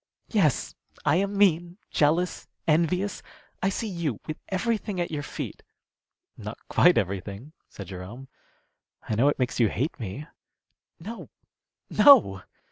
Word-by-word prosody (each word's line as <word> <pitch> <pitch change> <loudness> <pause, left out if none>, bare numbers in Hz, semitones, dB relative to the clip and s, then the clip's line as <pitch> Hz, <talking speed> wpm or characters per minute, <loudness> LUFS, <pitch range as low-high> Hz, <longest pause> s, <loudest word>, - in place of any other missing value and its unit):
"Yes, 180 - +1 0.3
I - - +4
am 200 +1 -1
mean, 175 -2 +3
jealous, 165 +4 +1 0.2
envious. 170 +5 +1 0.4
I 190 - +2
see 220 +3 -3
you 170 - -3
with 155 - -5
everything 210 0 -1
at 175 - -2
your 150 -2 -2
feet - - -6 0.4
" - - -67 0.3
"Not - - -7
quite - - +5
everything," 100 - -3 0.2
said 100 - -9
Jerome. 100 +8 -8 0.8
"I - - -1
know 120 +7 +4
it - - -1
makes 125 -1 -1
you 115 -3 +4
hate 140 - -2
me." 110 +6 -6 0.7
"No! 220 +8 -8 0.6
no!" 215 - +7
155 Hz, 135 wpm, -26 LUFS, 120-190 Hz, 0.8 s, no